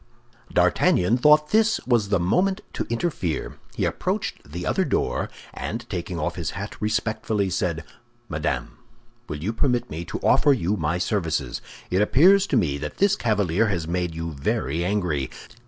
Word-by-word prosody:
D'Artagnan 90 +7 +3
thought 150 +2 +5
this 220 0 +3
was 115 -5 +2
the 100 -3 +2
moment 190 - +1
to - - -3
interfere. 115 - -2 0.2
He - - 0
approached 75 - -3
the 90 +3 -5
other 190 - +1
door, 130 - -1 0.2
and 115 +2 -5
taking 90 -2 -3
off 85 +3 -2
his 85 0 -4
hat 100 +2 -5
respectfully, 110 -2 0
said, 85 -2 -1 0.4
"Madame, 75 -4 -3 0.5
will 75 - -3
you 110 +5 -1
permit 125 0 0
me 80 +3 -4
to - - -4
offer 145 - +5
you 105 -5 0
my 80 -2 -1
services? 80 - -1 0.3
It 95 +2 +3
appears 185 - +5
to 135 - +2
me 75 -9 +1
that 75 0 -6
this 200 +1 +4
cavalier 105 - +1
has 85 -6 -2
made 90 -1 -2
you 80 0 -4
very 70 +2 -1
angry. 90 -9 0
95 Hz, 160 wpm, -24 LUFS, 85-120 Hz, 0.5 s, thought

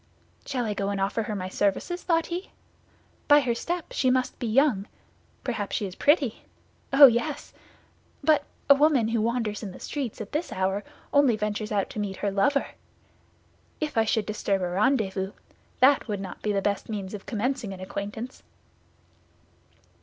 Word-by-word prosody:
"Shall 250 -3 -1
I 210 - -1
go 200 0 -2
and 200 -1 -2
offer 195 +4 0
her 215 -1 -3
my 185 -2 -3
services?" 205 - -1
thought 330 -2 +1
he. 355 +3 -5 0.8
"By 290 0 +7
her 245 -3 0
step 345 +8 -4
she 255 - +2
must 255 0 0
be 240 - -2
young; 225 -4 +3 0.6
perhaps 220 -5 -2
she 210 - -1
is 185 - -6
pretty. 280 - +2 0.5
Oh, 275 +1 +10
yes! 275 +4 +1 0.7
But 300 -1 +4 0.2
a 280 - +9
woman 280 -5 +3
who 230 -1 +1
wanders 225 -2 -1
in 200 -4 -6
the - - -11
streets 270 -7 -4
at 215 -2 -7
this 315 +3 -2
hour 190 +2 -1 0.3
only 280 -5 +5
ventures 210 0 -3
out 200 -2 +1
to - - -5
meet 200 -2 -3
her 200 - -1
lover. 280 +9 +2 1.1
If 305 -2 -3
I 225 -1 +3
should 215 -1 +1
disturb 200 -2 -1
a 180 - -1
rendezvous, 195 -1 +1 0.5
that 270 0 +5
would 205 -3 -2
not 190 -2 -7
be 210 - 0
the 200 -1 0
best 200 +1 -1
means 200 -3 -4
of 205 - -8
commencing 240 0 -2
an 190 - -8
acquaintance." 205 +6 -6
220 Hz, 175 wpm, -26 LUFS, 200-275 Hz, 1.1 s, Oh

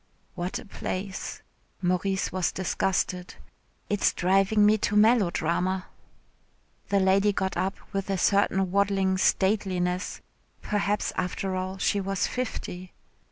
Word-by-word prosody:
"What 175 +1 -3
a - - -9
place," 195 -1 -5 0.4
Maurice 190 +2 0
was 185 -2 0
disgusted; 185 -1 -1 0.5
"it 205 -1 -1
is - - +4
driving 195 +3 +3
me 215 +1 +4
to 210 - 0
melodrama." 185 -4 +2 1.0
The 200 - +3
lady 195 +2 +4
got 190 -1 -2
up 190 +2 -1 0.2
with 195 0 -2
a 195 - +1
certain 195 -1 +2
waddling 195 -1 +2
stateliness 185 -2 +1 0.4
(perhaps 205 0 -1
after 185 +1 -2
all 185 +1 -3
she 200 +1 +1
was 195 0 -1
fifty). 185 -7 -5
190 Hz, 120 wpm, -27 LUFS, 185-200 Hz, 1.0 s, is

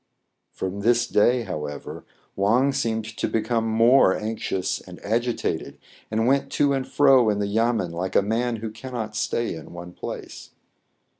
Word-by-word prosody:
From 95 +1 -4
this 120 +3 +3
day, 120 +3 +3
however, 75 -7 -6 0.3
Wang 115 +8 +3
seemed 115 -5 -1
to 115 +1 -3
be 115 - 0
come 115 0 0
more 115 -1 +5
anxious 105 -4 -2
and 90 -1 -12
agitated, 120 +3 -1 0.3
and 110 +1 0
went 135 +2 +2
to 145 -1 +3
and 135 -1 -2
fro 135 -5 +5
in 105 - +1
the 100 - 0
yamen 110 -3 0
like 90 +3 -4
a - - +5
man 115 +3 0
who 110 0 -5
cannot 110 -2 -6
stay 115 +2 -1
in 80 0 -10
one 85 0 -9
place. - - -8
110 Hz, 160 wpm, -24 LUFS, 100-120 Hz, 0.3 s, more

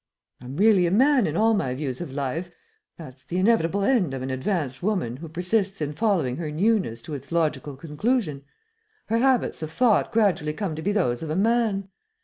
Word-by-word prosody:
I'm 130 +3 -8
really 200 -3 +5
a - - -1
man 260 +3 +4
in 155 - -2
all 225 +1 +4
my 130 -12 -1
views 130 -1 -4
of 175 - -6
life 145 +6 -3 0.5
that's 135 -5 -11
the 175 - -4
inevitable 195 -2 +2
end 195 - +2
of 130 - -5
an 130 - -3
advanced 135 -1 -2
woman 180 - -1
who 160 +3 -9
persists 190 +4 -1
in 150 -2 -2
following 165 - 0
her 160 -2 -4
'newness' 170 - 0
to 150 - -7
its 140 +1 -8
logical 150 -4 -1
conclusion. 155 - -2 0.7
Her 230 +1 +2
habits 260 -7 +1
of 155 -1 -5
thought 230 +3 +2
gradually 180 -9 +1
come 180 -2 -3
to 160 - -5
be 200 - 0
those 145 -13 0
of 160 - -5
a 155 - -1
man. 210 -1 +1
170 Hz, 195 wpm, -25 LUFS, 145-210 Hz, 0.7 s, really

